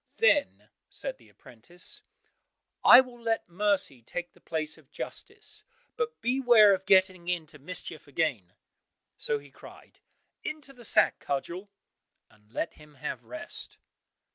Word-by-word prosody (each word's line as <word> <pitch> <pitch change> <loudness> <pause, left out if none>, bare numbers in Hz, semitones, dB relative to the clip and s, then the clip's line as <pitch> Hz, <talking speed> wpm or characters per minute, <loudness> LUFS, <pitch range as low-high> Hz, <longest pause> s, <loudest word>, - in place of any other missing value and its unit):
Then 295 -11 +3 0.2
said - - -5
the - - -20
apprentice, 150 +10 -9 0.8
"I 250 - +11
will 245 -2 -12
let 225 -1 0
mercy 190 - +1
take 175 +9 -5
the - - -23
place 155 -1 -2
of 145 -3 -23
justice, - - -7 0.3
but 465 0 -2
beware 240 -5 +6
of 190 0 -3
getting 185 -2 +4
into 160 -4 -3
mischief 160 0 -5
again!" 135 - -1 0.7
So 145 - +1
he 145 -1 -14
cried, - - -15 0.4
"Into 300 -3 -6
the 245 -2 -14
sack, - - +4
Cudgel!" 170 +8 -3 0.6
and 105 0 -26
let 165 - -2
him 150 -1 -17
have 125 -2 -5
rest. 125 +2 -7
175 Hz, 135 wpm, -29 LUFS, 145-230 Hz, 0.8 s, I